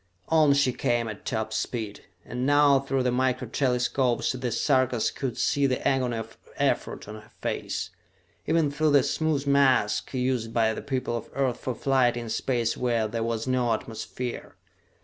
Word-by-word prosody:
On 155 -3 +5
she 140 -3 +2
came 120 -1 0
at 105 -2 -8
top 110 -2 -2
speed, 110 -2 -3 0.2
and 125 +1 -4
now 145 0 +5
through 135 -1 -1
the 125 - +1
micro 130 0 0
telescopes 125 0 +1
the 125 -1 -3
Sarkas 130 -1 +2
could 130 -4 -4
see 140 -1 +2
the 130 -1 -1
agony 125 -3 +1
of 110 0 -8 0.2
effort - - -1
on 105 - -7
her 110 - -19
face, - - -3 0.6
even 160 -2 +2
through 150 +1 +1
the 140 -2 +6
smooth 155 -1 0
mask 135 -6 +3
used 125 -3 -1
by 110 -1 +3
the - - -5
people 130 -3 -2
of 115 - -5
Earth 130 -3 0
for 130 - -3
flight 130 -3 +2
in 120 -1 -5
space 115 0 0
where 120 -3 0
there 115 +1 -3
was 115 0 -2
no 125 -2 +1
atmosphere. 115 +3 -5
125 Hz, 170 wpm, -26 LUFS, 115-135 Hz, 0.6 s, the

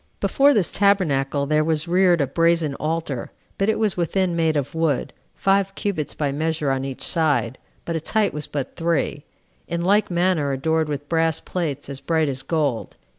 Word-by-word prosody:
Before 270 +9 +4
this 210 - +1
tabernacle 145 -9 +2
there 155 +1 +2
was 160 +1 0
reared 175 -1 +3
a - - +3
brazen 165 +1 +1
altar, 155 -5 -3 0.3
but 195 +2 +2
it 220 - +1
was 215 -3 +1
within 180 +1 0
made 160 -2 +1
of 140 -2 -3
wood, 160 -5 0 0.2
five 195 0 +1
cubits 180 -8 -3
by 145 -2 -1
measure 155 0 -1
on 135 0 -1
each 135 -1 -5
side, 155 -5 +1 0.3
but 170 - -3
its 160 - -3
height 215 -2 +2
was 150 0 -4
but 140 -3 -4
three, 165 -3 -1 0.4
in 170 0 -2
like 205 +4 +3
manner 175 -5 +1
adorned 160 +3 0
with 145 0 -4
brass 165 -1 +1
plates 155 -6 -4
as 140 -1 -5
bright 160 +1 0
as 135 -1 -3
gold. 145 -5 -1
160 Hz, 180 wpm, -22 LUFS, 145-180 Hz, 0.4 s, Before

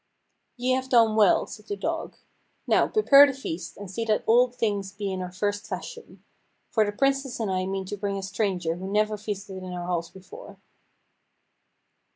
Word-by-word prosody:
"Ye 250 +1 0
have 260 0 0
done 230 -3 +4
well," 210 -4 +4
said 215 0 -11
the 205 - -3
dog. 325 +11 -4 0.5
"Now, - - +3
prepare 285 -10 +7
the 280 - -2
feast, 180 -10 -6
and 205 - -8
see 195 +5 -4
that 215 -1 +1
all 245 +3 +5
things 205 -5 -2
be 200 -1 -4
in 185 - -4
our 180 -1 -5
first 205 +3 -2
fashion: 475 -1 -8 0.5
for 220 - +3
the 205 - -1
Princess 275 +2 0
and 215 -4 -1
I 185 0 -1
mean 195 0 -3
to 205 +2 -5
bring 200 0 -2
a 195 - -5
stranger 190 -4 -1
who 190 +1 -6
never 215 +1 +1
feasted 200 -2 -6
in 185 -1 -7
our 175 -1 -5
halls 170 -1 -2
before." 315 - -12
205 Hz, 190 wpm, -26 LUFS, 190-240 Hz, 0.5 s, prepare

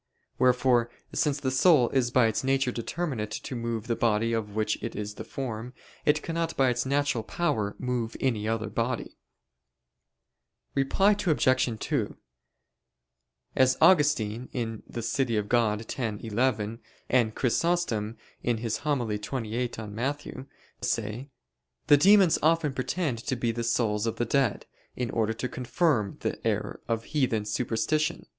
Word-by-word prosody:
Wherefore, 125 -2 +3 0.2
since 145 -2 +1
the 130 -2 -1
soul 130 -2 +5
is 130 -3 +2
by 125 -1 +4
its 110 +2 0
nature 135 -1 +2
determinate 120 -2 -3
to 110 +4 -5
move 115 -2 -3
the 120 -1 0
body 115 0 +1
of 105 -2 -3
which 110 0 0
it - - -5
is 105 0 -4
the - - -7
form, 125 -2 -5 0.3
it 150 +1 +3
cannot 165 0 -2
by 135 -1 +4
its 120 +2 -1
natural 140 -4 +1
power 110 -9 -1
move 125 -3 -2
any 110 -5 0
other 110 -2 -1
body. 115 +2 -2 1.5
Reply 140 +9 +3
Obj. 130 - +2
2: 135 -9 -2 1.4
As 130 0 +4
Augustine 130 - +3 0.4
(De 120 - -5
Civ. 135 +3 0 0.2
Dei 115 -3 +2
x, - - -7
11) 110 0 -1 0.3
and 115 -4 +2
Chrysostom 125 -6 0 0.3
(Hom. 120 -1 +1
xxviii 115 -1 -2
in 105 -2 -7
Matt.) 135 +6 -2 0.5
say, 120 +6 -2 0.6
the 145 -1 +7
demons 195 +1 +6
often 160 -2 +2
pretend 130 -1 -2
to 130 - -2
be 120 -1 0
the 120 +1 -3
souls 115 -2 +1
of 115 - -1
the 120 - -1
dead, 130 -2 +1 0.3
in 125 -2 -2
order 110 -1 0
to 120 +3 -3
confirm 125 - 0
the - - -3
error - - -2
of 115 -1 -1
heathen 125 -8 0
superstition. 125 +8 -1
120 Hz, 140 wpm, -28 LUFS, 110-140 Hz, 1.5 s, the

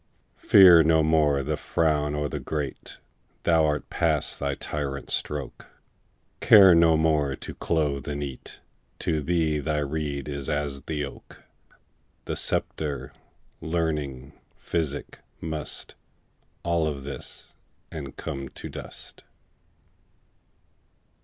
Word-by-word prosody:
Fear 90 -4 +8
no 80 -1 +4
more 75 -3 +3
the 75 +3 -1
frown 75 -1 0
o' 75 0 -1
the - - -4
great, 75 -3 -5 0.5
Thou 80 -2 +4
art 75 0 -1
past 80 -4 0
the 70 -1 -1
tyrant's 70 -2 -4
stroke; 75 -4 -4 0.7
Care 95 -4 +8
no 85 -1 +5
more 75 -4 +2
to - - -8
clothe 75 -5 -1
and 75 0 -3
eat; 70 -3 -8 0.4
To 80 -2 -1
thee 80 -1 +1
the 75 0 -1
reed 70 -1 -3
is 70 -2 -4
as 75 -2 -2
the 75 -1 -3
oak: 70 - -13 0.8
The - - -3
sceptre, 75 -3 -1 0.5
learning, 75 -5 -2 0.2
physic, 75 -4 -3 0.2
must 80 -1 -4 0.7
All 85 -1 +1
follow 75 -2 -2
this, 70 +1 -8 0.4
and 70 -4 -7
come 70 -1 -5
to - - -8
dust. - - -10
75 Hz, 115 wpm, -26 LUFS, 70-80 Hz, 0.8 s, Fear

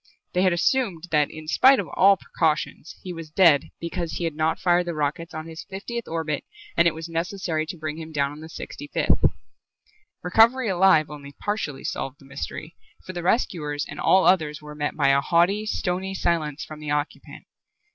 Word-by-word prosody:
They 180 - +2
had 185 -1 +4
assumed 175 -1 +1
that 150 -2 +3
in 155 0 -10
spite 265 - +6
of - - -3
all 195 +1 +6
precautions 160 -2 -2
he 180 - -5
was 165 -2 -8
dead 155 -3 +4
because 170 0 -4
he - - -3
had 165 -2 -1
not 155 +1 0
fired 175 0 +2
the 170 - -3
rockets 155 +3 -2
on 155 0 -6
the 165 - -9
fiftieth 200 +8 -6
orbit 160 -3 -2 0.3
and 170 0 +5
it 170 - +1
was 160 +1 -6
necessary 165 -1 -2
to 175 - -6
bring 155 -1 -4
him 160 0 -8
down 140 -2 0
on 145 - -10
the 160 +1 -10
sixty 145 - -8
fifth. - - +1 1.0
Recovery 225 +6 +4
alive 180 -5 +4
only 140 -1 -9
partially 155 -8 -3
solved 135 +1 -4
the 135 - -17
mystery, 145 +3 -7 0.3
for 185 - -7
the 175 - -4
rescuers 160 - 0
and - - -8
all 190 - +4
others 155 -5 +3
were 150 0 -10
met 150 0 -3
by 140 -3 +3
a 140 0 +4
haughty, 180 +7 +2
stony 190 -1 -2
silence 160 -4 -1
from 155 -1 -10
the 150 -1 -6
occupant. 145 +1 -3
165 Hz, 195 wpm, -24 LUFS, 150-185 Hz, 1.0 s, spite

